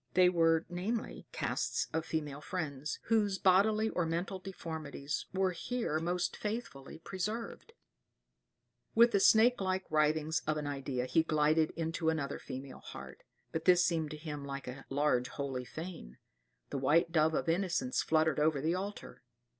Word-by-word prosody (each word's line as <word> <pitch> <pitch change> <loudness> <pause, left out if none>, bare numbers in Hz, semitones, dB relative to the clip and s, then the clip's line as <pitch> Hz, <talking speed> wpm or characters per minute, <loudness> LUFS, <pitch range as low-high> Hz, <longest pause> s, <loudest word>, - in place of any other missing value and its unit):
They 180 0 +7
were, 165 -2 +3
namely, 195 +6 -3
casts - - -1
of 160 0 -1
female 150 -3 -3
friends, 150 -4 -4
whose 210 -4 +2
bodily 210 +4 +4
or 180 - 0
mental 175 +4 -2
deformities 160 -6 -5
were 190 0 +1
here 180 -3 -2
most 175 +2 -1
faithfully 210 - -5
preserved. 210 - -5 1.2
With 235 +1 +7
the 200 - +3
snake 225 +3 +5
like 190 0 -1
writhings 155 +1 +2
of 155 0 +1
an 150 - -3
idea 135 -3 -2
he 160 +5 +3
glided 155 0 +2
into 165 0 -1
another 145 -3 -2
female 130 +1 -8
heart; - - -10 0.3
but 160 - -3
this 180 -1 +6
seemed 160 -3 0
to 155 - -6
him 150 -2 -6
like 140 -1 -6
a 125 +2 -7
large 135 -3 +2
holy 135 -3 -4
fane. 160 - -8 0.3
[*] - - -47
The 140 - -2
white 165 +5 +3
dove 160 -1 +3
of - - -1
innocence 170 -6 +1
fluttered 160 -2 +2
over 150 -1 +3
the 160 +4 +1
altar. 200 +3 -5
160 Hz, 155 wpm, -33 LUFS, 150-185 Hz, 1.2 s, They